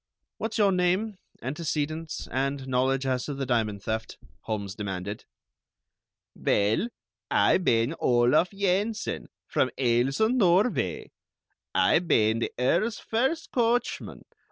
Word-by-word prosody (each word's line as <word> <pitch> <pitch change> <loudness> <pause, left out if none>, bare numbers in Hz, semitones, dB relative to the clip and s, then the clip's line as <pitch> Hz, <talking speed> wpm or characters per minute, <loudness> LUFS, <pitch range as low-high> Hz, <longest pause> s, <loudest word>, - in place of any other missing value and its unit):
"What's 225 +1 -3
your 205 -2 +4
name, 185 +3 0 0.2
antecedents, 155 +3 -3
and 135 +1 -1
knowledge 130 +1 +1
as 130 -2 0
to 145 - -4
the 135 0 -3
diamond 110 -5 0
theft?" 110 0 -3 0.3
Holmes 100 -3 -3
demanded. 100 0 -5 1.1
"Vell, 105 - +1 0.4
Ay - - +4
bane 120 -5 +2
Olaf 120 +8 +3
Yensen, 200 +2 -1 0.2
from - - +1
Aalesund, 135 - +2
Norvay. 175 - +2 0.6
Ay 95 +11 +4
bane 110 -10 +2
the - - -2
Earl's 180 - +1
first 265 +9 -1
coachman. 240 0 0
135 Hz, 110 wpm, -27 LUFS, 115-195 Hz, 1.1 s, your